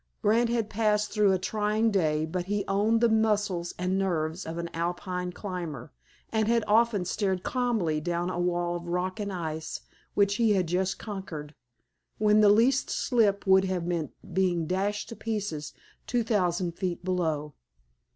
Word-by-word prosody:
Grant 230 Hz, +3 st, +3 dB
had 230 Hz, -3 st, 0 dB
passed 210 Hz, -1 st, +1 dB
through 210 Hz, -2 st, +3 dB
a 190 Hz, -, +3 dB
trying 215 Hz, +3 st, 0 dB
day, 155 Hz, -5 st, +1 dB
but 175 Hz, +2 st, -3 dB
he 205 Hz, 0 st, -1 dB
owned 210 Hz, +4 st, +2 dB
the 235 Hz, -, +6 dB
muscles 210 Hz, -6 st, +1 dB
and 185 Hz, +2 st, 0 dB
nerves 170 Hz, -2 st, -1 dB
of 165 Hz, +1 st, -5 dB
an 170 Hz, 0 st, -3 dB
Alpine 180 Hz, +2 st, -3 dB
climber, 175 Hz, -, -6 dB, 0.4 s
and 220 Hz, -1 st, +1 dB
had 230 Hz, -1 st, +3 dB
often 215 Hz, -3 st, +3 dB
stared 190 Hz, -1 st, -1 dB
calmly 225 Hz, -12 st, 0 dB
down 175 Hz, +2 st, -1 dB
a 175 Hz, -, -3 dB
wall 175 Hz, 0 st, 0 dB
of 175 Hz, 0 st, -6 dB
rock 180 Hz, +4 st, -2 dB
and 205 Hz, -1 st, -3 dB
ice 160 Hz, -3 st, -4 dB, 0.3 s
which 200 Hz, 0 st, +3 dB
he 225 Hz, -3 st, +4 dB
had 185 Hz, -3 st, +2 dB
just 185 Hz, +3 st, 0 dB
conquered, 175 Hz, -8 st, -7 dB, 0.6 s
when 210 Hz, 0 st, +4 dB
the 210 Hz, -, +7 dB
least 235 Hz, +6 st, +4 dB
slip 210 Hz, -5 st, +1 dB
would 190 Hz, 0 st, +5 dB
have 185 Hz, -3 st, -2 dB
meant 170 Hz, -3 st, -2 dB, 0.2 s
being 175 Hz, -2 st, +1 dB
dashed 195 Hz, +4 st, -1 dB
to 230 Hz, -, -7 dB
pieces 205 Hz, -11 st, -3 dB, 0.4 s
two 245 Hz, -1 st, +1 dB
thousand 180 Hz, -5 st, 0 dB
feet 180 Hz, -2 st, -3 dB
below. 160 Hz, -5 st, -1 dB
190 Hz, 165 wpm, -28 LUFS, 175-210 Hz, 0.6 s, the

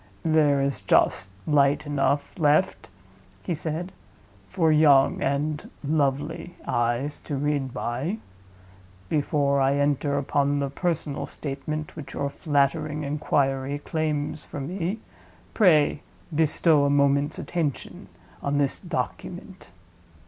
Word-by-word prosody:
"There 150 Hz, -3 st, +3 dB
is 140 Hz, -1 st, -1 dB
just 95 Hz, -, +2 dB, 0.2 s
light 145 Hz, -1 st, +3 dB
enough 145 Hz, +2 st, -1 dB
left," 150 Hz, -, +2 dB, 0.5 s
he 175 Hz, -, -2 dB
said, 165 Hz, +3 st, -3 dB, 0.6 s
"for 165 Hz, -4 st, +2 dB
young 145 Hz, -3 st, +5 dB
(and 145 Hz, +2 st, -1 dB
lovely) 150 Hz, +3 st, -1 dB
eyes 120 Hz, +5 st, -1 dB
to 145 Hz, -, -5 dB
read 140 Hz, -1 st, -1 dB
by. 130 Hz, -, -3 dB, 0.9 s
Before 140 Hz, -2 st, +1 dB
I 135 Hz, +1 st, +3 dB
enter 145 Hz, 0 st, +1 dB
upon 140 Hz, 0 st, +1 dB
the 140 Hz, -1 st, -1 dB
personal 160 Hz, -2 st, -2 dB
statement 150 Hz, +2 st, -5 dB
which 150 Hz, -4 st, -8 dB
your 140 Hz, 0 st, -2 dB
flattering 150 Hz, +1 st, 0 dB
inquiry 140 Hz, -1 st, 0 dB
claims 150 Hz, -1 st, -2 dB
from 140 Hz, 0 st, -6 dB
me, 190 Hz, +3 st, -2 dB, 0.6 s
pray 155 Hz, -8 st, +4 dB, 0.3 s
bestow 155 Hz, -1 st, +3 dB
a -, -, +2 dB
moment's 140 Hz, 0 st, +2 dB
attention 160 Hz, -6 st, -3 dB, 0.3 s
on 140 Hz, 0 st, 0 dB
this 140 Hz, -2 st, +1 dB
Document." 180 Hz, +1 st, -5 dB
145 Hz, 110 wpm, -25 LUFS, 140-155 Hz, 0.9 s, young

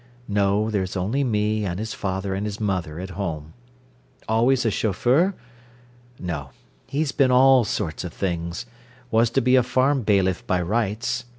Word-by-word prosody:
No, 105 Hz, +1 st, +1 dB
there's 95 Hz, -2 st, -2 dB
only 110 Hz, +10 st, 0 dB
me 105 Hz, -3 st, 0 dB
and 90 Hz, -3 st, -2 dB
his 110 Hz, +1 st, -4 dB
father 95 Hz, -2 st, -3 dB
and 100 Hz, +1 st, -3 dB
mother 90 Hz, -7 st, -2 dB
at 95 Hz, +1 st, -6 dB
home. 80 Hz, -5 st, -5 dB, 0.7 s
Always 120 Hz, +3 st, +2 dB
a 115 Hz, -, +2 dB
chauffeur? 125 Hz, -, +2 dB, 0.8 s
No, 80 Hz, -6 st, -5 dB, 0.4 s
he's 145 Hz, 0 st, -1 dB
been 135 Hz, -2 st, +3 dB
all 130 Hz, 0 st, +6 dB
sorts 85 Hz, -7 st, -3 dB
of 90 Hz, -, -5 dB
things: 85 Hz, +1 st, -3 dB, 0.5 s
was 115 Hz, 0 st, +4 dB
to 135 Hz, +3 st, +1 dB
be 125 Hz, +1 st, +4 dB
a 130 Hz, -, +6 dB
farm 130 Hz, +3 st, +1 dB
bailiff 95 Hz, -4 st, +1 dB
by 90 Hz, -, +1 dB
rights. 115 Hz, +5 st, -1 dB
105 Hz, 155 wpm, -23 LUFS, 95-120 Hz, 0.8 s, all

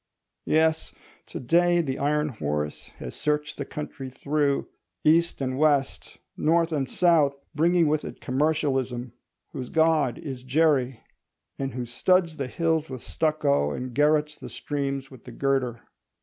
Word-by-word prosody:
Yes: 160 Hz, 0 st, +1 dB, 0.3 s
to -, -, -6 dB
day 175 Hz, +6 st, +3 dB
the 135 Hz, -6 st, -2 dB
iron 150 Hz, +1 st, +1 dB
horse 75 Hz, -, -3 dB
has -, -, -7 dB
searched 150 Hz, 0 st, -2 dB
the 140 Hz, -, -2 dB
country 135 Hz, -3 st, -6 dB
through—east 150 Hz, +4 st, 0 dB
and 130 Hz, 0 st, -2 dB
west, 145 Hz, -3 st, +1 dB, 0.2 s
north 165 Hz, +1 st, +2 dB
and 140 Hz, -5 st, -1 dB
south—bringing 165 Hz, +1 st, +2 dB
with 150 Hz, 0 st, +1 dB
it -, -, -8 dB
Commercialism, 130 Hz, -3 st, -1 dB, 0.4 s
whose 125 Hz, -2 st, -6 dB
god 160 Hz, -5 st, +2 dB
is 135 Hz, -4 st, -6 dB
Jerry, 130 Hz, -3 st, +1 dB, 0.6 s
and 135 Hz, -2 st, -3 dB
who 125 Hz, -1 st, -3 dB
studs 170 Hz, +7 st, +1 dB
the 135 Hz, -3 st, -3 dB
hills 160 Hz, +1 st, 0 dB
with 130 Hz, -3 st, -7 dB
stucco 75 Hz, -, +1 dB
and 125 Hz, -, -5 dB
garrotes 150 Hz, +2 st, +2 dB
the -, -, -8 dB
streams 140 Hz, -2 st, -3 dB
with 130 Hz, -3 st, -14 dB
the 125 Hz, -, -9 dB
girder. 125 Hz, -2 st, -1 dB
145 Hz, 135 wpm, -26 LUFS, 130-155 Hz, 0.6 s, day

